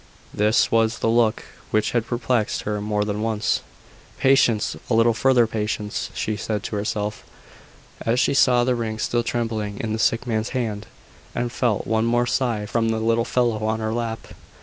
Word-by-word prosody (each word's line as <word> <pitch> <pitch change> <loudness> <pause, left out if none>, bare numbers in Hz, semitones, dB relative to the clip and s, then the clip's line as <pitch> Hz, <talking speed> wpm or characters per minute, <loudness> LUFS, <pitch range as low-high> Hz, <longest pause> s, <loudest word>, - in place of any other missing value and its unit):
This 105 +2 +2
was 115 0 +2
the - - -1
look 115 -1 +2 0.3
which 110 - +1
had 120 -1 0
perplexed 120 -2 -1
her 105 0 -2
more 105 0 0
than 105 0 -2
once. 110 -1 0 0.6
"Patience! 130 -5 +3
a 115 - +2
little 115 +1 +4
further 130 0 +4
patience!" 105 -1 -3
she 110 - -1
said 105 +1 -3
to - - -4
herself, 105 0 -3 0.8
as 115 +2 +1
she - - +2
saw 125 -2 +4
the 125 +1 +2
ring 115 -2 -3
still 120 +2 0
trembling 110 -3 -3
in 110 -1 -2
the 110 - -2
sick 115 +2 +1
man's 110 -2 -1
hand, 110 -4 -3 0.5
and 120 0 -1
felt 120 -4 0
one 110 0 +1
more 120 +1 +2
sigh 120 -4 0
from 115 +2 0
the 110 - 0
little 115 +1 +1
fellow 120 -4 0
on 110 +1 0
her 110 0 -2
lap. 115 -1 -4
115 Hz, 180 wpm, -23 LUFS, 110-120 Hz, 0.8 s, little